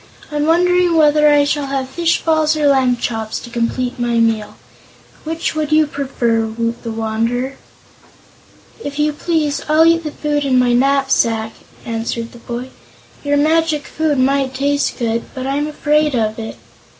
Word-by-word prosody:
"I'm 295 0 -1
wondering 355 0 +3
whether 300 -1 +5
I 290 0 +5
shall 285 0 -1
have 270 -1 -2
fish 335 +5 0
balls 315 -1 +2
or 300 - +1
lamb 260 -3 +3
chops 225 -2 -3
to 240 - -11
complete 245 +2 -2
my 240 -1 0
meal. 225 -2 0 0.7
Which 325 +1 -2
would 310 -1 -2
you 310 0 +5
prefer, 245 -6 -1
Woot 230 +1 -3
the 230 - -6
Wanderer?" 225 +4 -2 1.3
"If 285 0 -6
you 300 0 +1
please, 305 -2 -1
I'll 310 +1 +5
eat 330 0 +3
the 305 - -3
food 295 0 -2
in 265 -2 +2
my 250 -1 +3
knapsack," 245 -4 +1 0.3
answered 230 0 -3
the 240 - -14
boy. 245 +2 -6 0.5
"Your 290 0 +1
magic 310 0 +1
food 310 -2 -1
might 265 0 +1
taste 285 +1 0
good, 230 -1 -1
but 260 -1 -4
I'm 285 +2 -1
afraid 300 -1 +1
of 220 -1 -1
it." 220 -1 -6
275 Hz, 160 wpm, -17 LUFS, 235-300 Hz, 1.3 s, whether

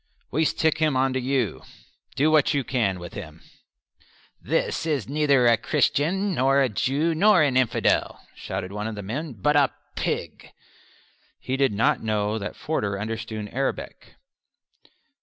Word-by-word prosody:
"We 160 +4 +1
stick 160 +1 +1
him 155 -4 +2
on 130 0 +2
to 130 - 0
you; 130 -4 -1 0.5
do 150 +3 +3
what 155 -1 +3
you 140 - +1
can 110 -8 0
with 85 -1 -9
him." 80 -5 -9 1.0
"This 165 - -1
is 145 -8 -1
neither 140 -3 +3
a 115 -1 +5
Christian, 185 - +1
nor 135 -1 +3
a 135 -2 +3
Jew, 140 +10 0
nor 190 +1 +5
an 140 -4 +1
infidel," 125 -3 +1
shouted 90 - -5
one 105 +1 -4
of 110 - -5
the 105 - -6
men, 135 +9 -4
"but 135 +8 0
a 140 -2 +5 0.3
pig." - - -4 0.9
He 130 - -3
did 135 -2 +2
not 100 - +2
know 110 0 -1
that 100 +1 -6
Forder 100 -10 -2
understood 110 0 -5
Arabic. 135 +1 -4
130 Hz, 155 wpm, -24 LUFS, 110-150 Hz, 1.0 s, a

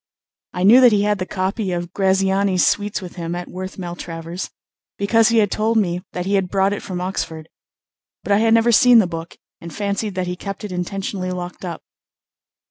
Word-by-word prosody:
I 180 - -2
knew 230 +7 +8
that 250 -2 +7
he 205 -1 +3
had 210 -1 +1
the 185 - -3
copy 190 +1 -2
of 175 0 -4
Graziani's 190 -1 +2
suites 205 -1 0
with 180 0 -10
him 170 0 -4
at 175 0 -5
Worth 185 +1 -7
Maltravers, 175 -1 -6 0.5
because 225 +3 +3
he 230 - +2
had 205 -3 +3
told 220 +1 +1
me 180 -4 0
that 180 0 -3
he 195 - -1
had 190 -2 +1
brought 195 +1 +2
it 205 - -4
from 180 -2 -5
Oxford; 165 -4 -4 0.8
but - - -4
I 200 - +5
had 225 0 +4
never 230 +1 +4
seen 245 +2 +6
the 220 - +5
book, 165 -1 -7 0.2
and 170 - -9
fancied 205 0 -3
that 185 -1 -1
he 180 0 -3
kept 195 +3 -7
it 210 - -5
intentionally 185 +1 -3
locked 180 0 -6
up. 170 -3 -6
190 Hz, 205 wpm, -20 LUFS, 180-205 Hz, 0.8 s, knew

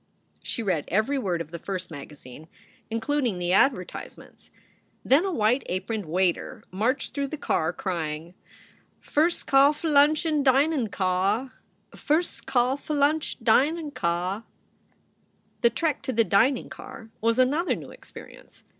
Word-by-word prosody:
She 230 - -3
read 180 -8 0
every 220 +9 +1
word 180 -8 -1
of 165 - -8
the 170 - -6
first 185 0 -5
magazine, 145 0 -11 0.4
including 230 -1 0
the 175 0 -1
advertisements. 195 -4 -1 0.6
Then 290 +8 +4
a 385 - -1
white 235 -2 +2
aproned 195 +1 -3
waiter 185 +7 -1
marched 225 +9 -1
through 280 -1 -2
the 305 - -6
car, 160 - 0
crying: 165 -3 -4 0.7
"Fir 310 +3 +2
scall 280 -4 +3
flunch 300 0 +3
in 305 -2 +1
dinin 270 -2 +3
caw. 195 +7 0 0.5
Firs 320 +4 0
scall 250 +1 +1
flunch 300 +1 0
dine 295 +7 +2
caw." 180 -1 -2 1.2
The 235 - +5
trek 310 +2 -1
to - - -3
the 230 -2 +3
dining 230 +6 +2
car 225 -1 -10
was 230 +1 +2
another 285 +8 +2
new - - -10
experience. - - -14
230 Hz, 135 wpm, -26 LUFS, 185-285 Hz, 1.2 s, The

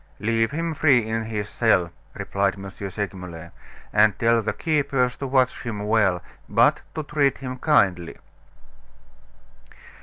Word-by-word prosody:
"Leave 115 +2 +1
him 165 +4 -3
free 140 -7 +3
in 110 0 -2
his 105 -2 -4
cell," 100 -7 +1 0.2
replied 100 -1 -1
M. 95 0 -8
Segmuller; 90 -4 -6 0.4
"and 105 0 +4
tell 115 0 +3
the 110 0 -1
keepers 135 -2 0
to 140 - -4
watch 130 -1 +1
him 110 -4 -5
well, 105 -5 +2 0.3
but - - +3
to 155 - -3
treat 145 -2 +1
him 130 -1 -7
kindly." 95 - +2
115 Hz, 130 wpm, -23 LUFS, 100-130 Hz, 0.4 s, and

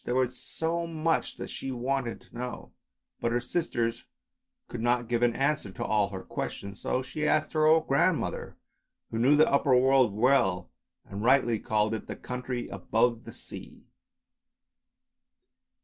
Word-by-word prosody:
There 120 - -2
was 130 -1 +1
so 170 +5 -3
much 160 0 -1
that - - -6
she 135 - -5
wanted 125 -1 -2
to - - -20
know, 125 +1 -6 0.5
but 115 - 0
her 120 - +2
sisters 120 -4 -2 0.6
could 120 - -6
not 120 0 +1
give 120 0 0
an 120 -1 +3
answer 140 -5 0
to - - -4
all 105 -2 +2
her 95 -2 -7
questions, 100 +1 -5
so 130 - -1
she 150 +3 -3
asked 150 - +1
her 155 -1 +3
old 160 0 +4
grandmother 165 +5 0 0.5
who 115 - -2
knew 135 +5 +5
the 155 +1 +5
upper 140 -2 +3
world 130 -2 +4
well, 110 -6 +2 0.3
and 100 +1 -7
rightly 120 -3 +3
called 110 +1 0
it 110 - -5
the - - -5
country 125 0 -4
above 115 0 0
the - - -8
sea. - - -9
125 Hz, 160 wpm, -28 LUFS, 115-140 Hz, 0.6 s, knew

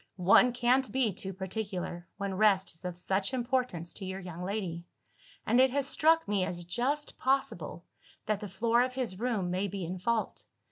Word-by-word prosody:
One 195 +7 +5
can't 250 +2 +2
be 250 -6 +1
too 190 +1 -6
particular, 190 -2 -4
when 200 -1 -3
rest 195 -1 +3
is 165 +3 -14
of 180 -1 -4
such 195 +6 0
importance 245 -9 -1
to 200 - -4
your 190 +1 -4
young 180 -2 -8
lady 180 -4 -3 0.6
and 245 - +4
it 265 - +5
has 275 +1 0
struck 320 +3 +3
me 200 -2 +1
as 175 -1 -3
just 255 - -1
possible, 255 - -1 0.4
that 210 -2 0
the 205 -2 -6
floor 230 +5 +2
of 255 0 -1
his 235 -8 -3
room 220 -7 -1
may 185 +3 0
be 195 -2 -4
in 180 +2 -5
fault. 225 +4 -1
200 Hz, 185 wpm, -30 LUFS, 185-245 Hz, 0.6 s, One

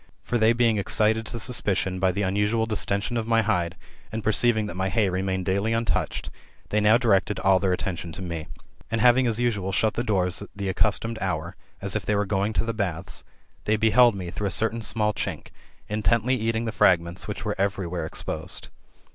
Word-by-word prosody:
For 120 - -1
they 110 +1 +5
being 115 -2 +2
excited 110 +2 +2
[to 115 - -5
suspicion] 100 -6 0
by 95 0 +3
the 100 +3 -2
unusual 105 +4 +1
distention 105 +1 -1
of 115 -1 -2
my 115 -1 +3
hide, 90 -6 0 0.4
and 110 0 -4
perceiving 110 0 +2
that 95 - -6
my 95 +1 -1
hay 105 -1 +1
remained 95 0 -2
daily 100 +4 0
untouched, 115 0 -1 0.4
they 105 - +1
now 105 +2 +6
directed 105 -4 +2
all 95 -1 +4
their 95 -1 +1
attention 90 -2 -3
to - - -7
me. 85 -2 -5 0.4
And 115 +1 -1
having 125 +2 +5
as 115 -1 +1
usual 105 -6 0
shut 110 +3 +2
the 120 - -2
doors 95 -6 0
at 100 - -8
the 100 -1 -3
accustomed 110 +4 +1
hour, 90 -2 -2 0.3
as 100 0 -1
if 110 - -1
they 105 +3 0
were 100 0 +1
going 100 +1 0
to 115 - 0
the 115 - -2
baths, 95 -7 -4 0.4
they 110 - +2
beheld 110 +1 +5
me 90 -3 -5
through 100 +2 -2
a - - 0
certain 115 +5 0
small 105 -1 0
chink, - - -4 0.4
intently 110 +4 +1
eating 115 -1 -1
the 115 - -2
fragments 85 -4 +2
which - - -5
were - - 0
every 100 -1 0
where 85 0 -3
exposed. - - -5
105 Hz, 205 wpm, -25 LUFS, 95-115 Hz, 0.4 s, now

